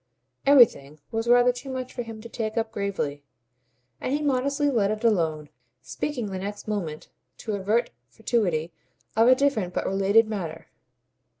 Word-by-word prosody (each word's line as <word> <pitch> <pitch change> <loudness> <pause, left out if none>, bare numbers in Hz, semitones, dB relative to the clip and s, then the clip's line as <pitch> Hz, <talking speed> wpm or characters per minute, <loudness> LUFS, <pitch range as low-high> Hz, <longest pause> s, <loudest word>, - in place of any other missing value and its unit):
"Everything" 180 - +5
was 225 +1 -2
rather 245 +1 +6
too 245 +2 -9
much 255 -1 -5
for 245 - -4
him 225 -2 -8
to 235 - -9
take 220 -1 -4
up 225 -1 -1
gravely, 195 -9 -3 0.8
and - - -3
he 295 +2 0
modestly 280 +1 +1
let 210 -6 +2
it 215 +1 -3
alone, 160 -9 +1 0.3
speaking 235 - -4
the 190 - -4
next 205 +2 -6
moment, 175 -8 -4 0.3
to 220 - -5
avert 210 +4 0 0.2
fatuity, 180 -9 -1 0.4
of 225 +2 +5
a 255 - +7
different 255 -10 0
but - - -1
a - - 0
related 195 +3 +3
matter. 165 -7 -5
220 Hz, 165 wpm, -25 LUFS, 190-245 Hz, 0.8 s, a